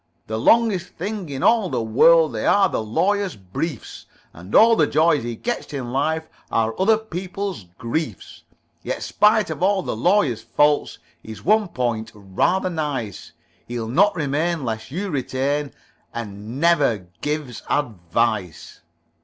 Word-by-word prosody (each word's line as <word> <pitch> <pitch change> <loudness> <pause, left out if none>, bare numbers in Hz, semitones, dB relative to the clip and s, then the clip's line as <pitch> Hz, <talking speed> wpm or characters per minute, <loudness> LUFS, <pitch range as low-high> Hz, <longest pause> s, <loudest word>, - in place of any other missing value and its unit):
The 110 0 -3
longest 200 - +2
things 190 -3 -5
in 135 -1 -4
all 225 -5 +4
the - - -1
world 155 +7 +5
They 110 - -2
are 200 -1 +5
the 175 - -2
Lawyer's 195 - 0
briefs, 105 - -6 0.3
And 90 +5 -7
all 230 +1 +7
the 155 -8 +3
joys 160 -1 +3
he 120 0 -4
gets 240 - -4
in 125 -4 -4
life 160 +4 0 0.2
Are 115 0 +1
other 215 +3 +4
people's 190 - -5
griefs. 115 - -4 0.4
Yet - - -4
spite 210 -3 +3
of 160 - -6
all 190 0 +2
the - - -3
Lawyer's 135 - +2
faults 145 +6 +1 0.2
He's 110 -1 -10
one 215 +2 +3
point 120 -7 -2
rather 105 - 0
nice: 145 - -4 0.3
He'll 120 -2 -4
not 195 - +3
remain 155 0 -1
lest 110 -1 -4
you 185 +6 -4
retain 140 +1 -1 0.4
And 110 +2 -6
never 145 - +2 0.2
gives 150 -4 -3
advice." 110 - -2
145 Hz, 145 wpm, -22 LUFS, 115-180 Hz, 0.4 s, all